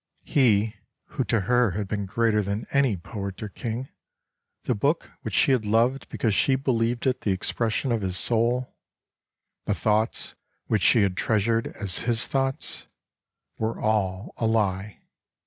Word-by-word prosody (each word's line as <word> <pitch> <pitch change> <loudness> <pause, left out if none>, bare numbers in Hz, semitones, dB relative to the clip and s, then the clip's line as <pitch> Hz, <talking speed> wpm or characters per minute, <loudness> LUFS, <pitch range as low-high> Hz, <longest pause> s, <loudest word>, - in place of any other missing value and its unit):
He 110 -5 +2 0.3
who 140 -3 -1
to 110 +1 +1
her 120 +3 +3
had 105 -2 -2
been 100 -1 -3
greater 110 +1 +2
than 100 +2 -3
any 135 -7 +2
poet 100 +3 -6
or 105 - -5
king, 115 +6 -5 0.7
the - - +1
book 145 +10 0
which - - -4
she 140 - +4
had 125 -4 +2
loved 115 +6 +1
because 110 -3 0
she 135 +6 +3
believed 120 -2 0
it 130 -1 +1
the 100 - 0
ex 95 - -2
pression 115 +3 -1
of 115 -2 0
his 95 -1 -1
soul, 120 +3 +1 0.9
the - - 0
thoughts 110 +2 0 0.3
which 105 - +1
she 110 +4 +5
had 95 -2 0
treasured 115 +3 +1
as 95 -4 0
his 115 -1 +1
thoughts 135 -1 -2 0.3
— - - -56
were 110 +1 -2
all 100 -2 -1
a 115 - 0
lie. 105 -2 0
110 Hz, 165 wpm, -25 LUFS, 100-125 Hz, 0.9 s, she